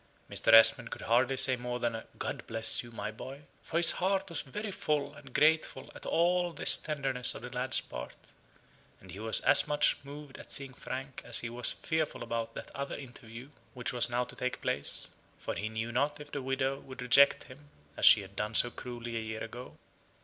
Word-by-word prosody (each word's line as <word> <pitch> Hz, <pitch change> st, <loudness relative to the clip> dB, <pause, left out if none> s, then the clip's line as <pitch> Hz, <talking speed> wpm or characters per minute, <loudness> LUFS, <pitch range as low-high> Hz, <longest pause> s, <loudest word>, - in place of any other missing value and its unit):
Mr. -, -, 0 dB
Esmond 115 Hz, +2 st, +7 dB
could -, -, -8 dB
hardly 125 Hz, +3 st, +2 dB
say 130 Hz, 0 st, +3 dB
more 125 Hz, 0 st, -5 dB
than 120 Hz, -1 st, -1 dB
a 110 Hz, -, -7 dB
"God -, -, -5 dB
bless 110 Hz, 0 st, +4 dB
you, 120 Hz, -, -12 dB
my 110 Hz, -1 st, -5 dB
boy," 130 Hz, +6 st, -10 dB, 0.2 s
for 165 Hz, -, -4 dB
his 170 Hz, -1 st, +6 dB
heart 195 Hz, +1 st, -1 dB
was 170 Hz, -, -3 dB
very 210 Hz, +10 st, -6 dB
full 150 Hz, -5 st, -2 dB
and 140 Hz, -3 st, -14 dB
grateful 155 Hz, +4 st, +1 dB
at -, -, -7 dB
all 175 Hz, +1 st, +1 dB
this 145 Hz, -, +8 dB
tenderness 135 Hz, -5 st, 0 dB
on -, -, -9 dB
the 120 Hz, -, -8 dB
lad's 125 Hz, +1 st, 0 dB
part; -, -, -9 dB, 0.8 s
and 95 Hz, -, -14 dB
he 95 Hz, -, -9 dB
was 110 Hz, +1 st, -1 dB
as -, -, +4 dB
much 150 Hz, 0 st, +2 dB
moved 145 Hz, 0 st, -11 dB
at -, -, -12 dB
seeing 135 Hz, -2 st, -3 dB
Frank 135 Hz, +2 st, -7 dB
as 120 Hz, -, +1 dB
he 115 Hz, -, -5 dB
was 120 Hz, +1 st, -2 dB
fearful 160 Hz, -6 st, -3 dB
about 115 Hz, -1 st, -4 dB
that -, -, -9 dB
other 140 Hz, 0 st, -4 dB
interview 120 Hz, 0 st, -11 dB, 0.2 s
which 125 Hz, -1 st, -4 dB
was 120 Hz, 0 st, +5 dB
now 120 Hz, +1 st, 0 dB
to -, -, -11 dB
take 125 Hz, 0 st, -3 dB
place: 70 Hz, -, -1 dB, 0.3 s
for -, -, -5 dB
he 105 Hz, -, -4 dB
knew 110 Hz, +1 st, -4 dB
not 145 Hz, +4 st, -1 dB
if 145 Hz, 0 st, -11 dB
the 140 Hz, -, -4 dB
widow 135 Hz, +1 st, -2 dB
would 130 Hz, -2 st, -10 dB
reject 140 Hz, +3 st, +5 dB
him 145 Hz, +3 st, -16 dB, 0.3 s
as -, -, -8 dB
she -, -, +9 dB
had -, -, -13 dB
done 105 Hz, +1 st, -3 dB
so 120 Hz, -, +4 dB
cruelly 120 Hz, -1 st, -7 dB
a -, -, -1 dB
year 110 Hz, 0 st, -6 dB
ago. 120 Hz, +3 st, -10 dB
130 Hz, 210 wpm, -30 LUFS, 115-145 Hz, 0.8 s, she